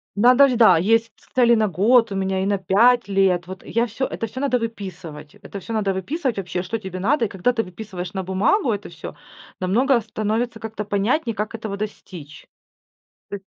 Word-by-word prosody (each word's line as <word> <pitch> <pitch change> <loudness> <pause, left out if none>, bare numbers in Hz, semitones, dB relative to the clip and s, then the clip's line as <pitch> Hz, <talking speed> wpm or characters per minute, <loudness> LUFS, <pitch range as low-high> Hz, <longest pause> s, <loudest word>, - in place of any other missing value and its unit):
Надо 250 +6 +6
ж, 255 - 0
да, 205 -7 +6
есть 225 +5 +1
ц - - -26
цели 240 -2 +4
на 220 -1 +2
год 225 +5 +3
у - - -3
меня 190 0 -1
и - - -1
на 200 0 +1
5 235 +6 +3
лет. 190 -3 +1
Вот 185 +1 -9
я 235 +1 0
всё 235 +4 -3
это 225 - -4
всё 260 +5 -7
надо 265 -3 +1
выписывать. 185 -9 -7
Это 200 -1 -9
всё 230 - -9
надо 205 -3 0
выписывать 260 - -3
вообще, 180 -2 -3
что 190 +5 -3
тебе 190 -4 -7
надо. 240 +5 +1
И - - -1
когда 195 +5 0
ты 225 - 0
выписываешь 185 -1 -8
на 190 -1 -3
бумагу 205 - +1
это 205 0 -6
всё, 165 -3 -9 0.5
намного 235 +7 +2
становится 220 +2 -3
как-то 220 -1 -5
понятнее, 230 +5 0
как 215 +2 -4
этого 215 -3 -5
достичь. 180 -7 -8 0.8
Ты 200 - -5
210 Hz, 200 wpm, -22 LUFS, 190-235 Hz, 0.8 s, Надо